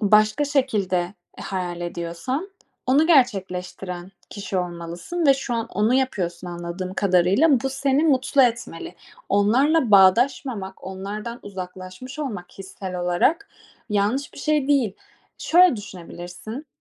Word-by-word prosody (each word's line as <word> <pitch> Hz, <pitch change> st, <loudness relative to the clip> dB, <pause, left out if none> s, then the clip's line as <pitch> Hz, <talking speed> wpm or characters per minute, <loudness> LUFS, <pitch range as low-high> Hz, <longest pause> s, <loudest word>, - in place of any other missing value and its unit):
başka 215 Hz, +6 st, +4 dB
şekilde, 205 Hz, -10 st, 0 dB, 0.2 s
e, -, -, -7 dB
hayal 180 Hz, -2 st, -4 dB
ediyorsan, 175 Hz, -, -4 dB, 0.4 s
onu 280 Hz, +5 st, +4 dB
gerçekleştiren 190 Hz, -, 0 dB, 0.2 s
kişi 200 Hz, -2 st, -3 dB
olmalısın 175 Hz, -, -3 dB
ve 275 Hz, -, +7 dB
şu 265 Hz, -2 st, -3 dB
an 230 Hz, 0 st, -1 dB
onu 210 Hz, +5 st, +1 dB
yapıyorsun 185 Hz, -10 st, -1 dB
anladığım 175 Hz, +2 st, -5 dB
kadarıyla. 200 Hz, -, +3 dB
Bu 270 Hz, -, -1 dB
seni 275 Hz, +2 st, +1 dB
mutlu 275 Hz, -2 st, +3 dB
etmeli. 230 Hz, -8 st, -1 dB, 0.3 s
Onlarla 245 Hz, +8 st, +3 dB
bağdaşmamak, 200 Hz, +1 st, +3 dB
onlardan 205 Hz, +5 st, -6 dB
uzaklaşmış 185 Hz, +6 st, -8 dB
olmak 210 Hz, -12 st, -5 dB
hissel 190 Hz, -1 st, -7 dB
olarak, 220 Hz, -, +1 dB, 0.4 s
yanlış 210 Hz, +7 st, 0 dB
bir -, -, -11 dB
şey 300 Hz, -3 st, +1 dB
değil. 265 Hz, -8 st, +3 dB, 0.5 s
Şöyle 355 Hz, -4 st, +5 dB
düşünebilirsin: 190 Hz, -, -8 dB
205 Hz, 120 wpm, -23 LUFS, 180-265 Hz, 0.5 s, ve